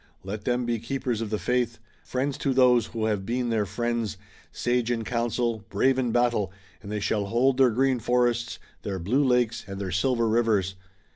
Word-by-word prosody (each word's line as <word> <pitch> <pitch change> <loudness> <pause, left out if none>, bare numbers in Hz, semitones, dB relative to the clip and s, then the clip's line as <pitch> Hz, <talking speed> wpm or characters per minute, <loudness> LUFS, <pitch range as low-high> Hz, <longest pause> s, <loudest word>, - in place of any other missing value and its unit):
Let 105 +2 -6
them 125 -1 +1
be 120 -1 -1
keepers 120 -1 -2
of 110 - -3
the 105 - -1
faith, 125 0 0 0.3
friends 135 +2 -2
to 135 -2 0
those 125 -3 +5
who 115 -2 -3
have 105 -3 0
been 120 +3 -1
their 105 -3 +1
friends, 115 +1 -2 0.3
sage 120 -1 0
in 115 -2 0
council, 115 -1 -1
brave 130 +6 +2
in 125 -3 0
battle, 120 -5 +1 0.3
and 100 0 -8
they 105 - -1
shall 105 0 0
hold 125 +5 +2
their 130 -2 +6
green 130 +2 +2
forests, 120 -1 +1 0.2
their 100 -2 -3
blue 110 +11 +1
lakes 125 -3 +2
and 100 0 -6
their 95 -2 -3
silver 115 +5 +1
rivers! 110 -4 +2
120 Hz, 190 wpm, -26 LUFS, 105-125 Hz, 0.3 s, their